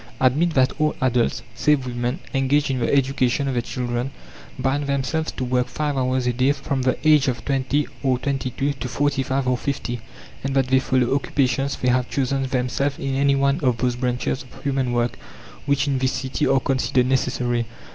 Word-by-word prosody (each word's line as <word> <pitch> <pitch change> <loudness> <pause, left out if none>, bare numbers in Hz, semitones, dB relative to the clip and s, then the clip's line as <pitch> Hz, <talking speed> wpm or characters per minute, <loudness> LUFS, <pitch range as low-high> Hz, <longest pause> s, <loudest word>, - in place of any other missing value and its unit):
Admit 150 +6 +2
that 130 -1 +3
all 155 0 +2
adults, 120 -2 +1
save 150 -4 +2
women, 120 +2 -2 0.2
engaged 135 +1 +2
in 130 - -1
the 120 - 0
education 135 -1 +2
of 135 - -1
their 120 - +1
children, 120 +1 -3 0.5
bind 135 +2 0
themselves 140 +3 -1
to - - -5
work 125 0 +1
5 145 +2 -2
hours 130 -1 0
a 125 - +1
day 130 +3 +3
from 140 -1 -3
the 130 0 +1
age 150 -2 +5
of 120 -3 -2
twenty 140 +1 +1 0.2
or 130 -2 +2
twenty 135 0 -2
two 140 +3 -1
to 135 - -5
forty 140 +2 0
five 130 0 -1
or 125 -1 +1
fifty, 120 -4 -3 0.4
and 135 0 -2
that 135 -2 +2
they 130 0 +5
follow 130 -2 +1
occupations 140 0 0
they 125 - 0
have 125 0 +1
chosen 135 0 0
themselves 130 +2 -1
in 135 - -3
any 140 +1 +3
one 140 +2 +2
of 125 -7 +1
those 125 -1 0
branches 125 +2 -1
of 130 - -14
human 135 -3 0
work 120 0 0 0.5
which 140 +1 +2
in 135 -2 +1
this 130 0 +1
city 130 -1 -1
are 135 0 +4
considered 130 -1 +1
necessary. 125 -2 0
130 Hz, 195 wpm, -22 LUFS, 125-140 Hz, 0.5 s, age